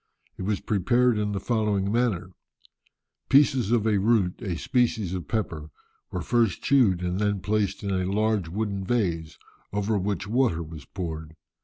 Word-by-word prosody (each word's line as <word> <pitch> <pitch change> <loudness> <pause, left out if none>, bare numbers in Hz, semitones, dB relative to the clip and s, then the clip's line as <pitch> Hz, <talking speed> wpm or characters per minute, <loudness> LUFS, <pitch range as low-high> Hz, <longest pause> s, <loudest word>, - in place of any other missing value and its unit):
It - - -9
was 100 +1 -1
prepared 120 +3 +2
in 105 0 -1
the 100 - -2
following 105 -4 0
manner: 110 -6 0 1.0
Pieces 135 -5 +4
of 115 -3 +2
a 105 -3 +3
root, 100 -3 +2
a 95 -7 -3
species 120 -6 0
of 90 -5 -4
pepper, 80 -9 -3 0.4
were - - -4
first 115 -4 +1
chewed, 110 -10 +3
and 90 +1 -1
then 105 -1 +1
placed 105 +1 -1
in 100 - -2
a 95 0 0
large 105 -4 +1
wooden 100 +1 -2
vase, 85 -8 -1 0.3
over 105 +1 0
which 95 -1 -2
water 110 -8 +1
was 80 -2 -10
poured. 80 -4 -6
100 Hz, 160 wpm, -26 LUFS, 90-115 Hz, 1.0 s, Pieces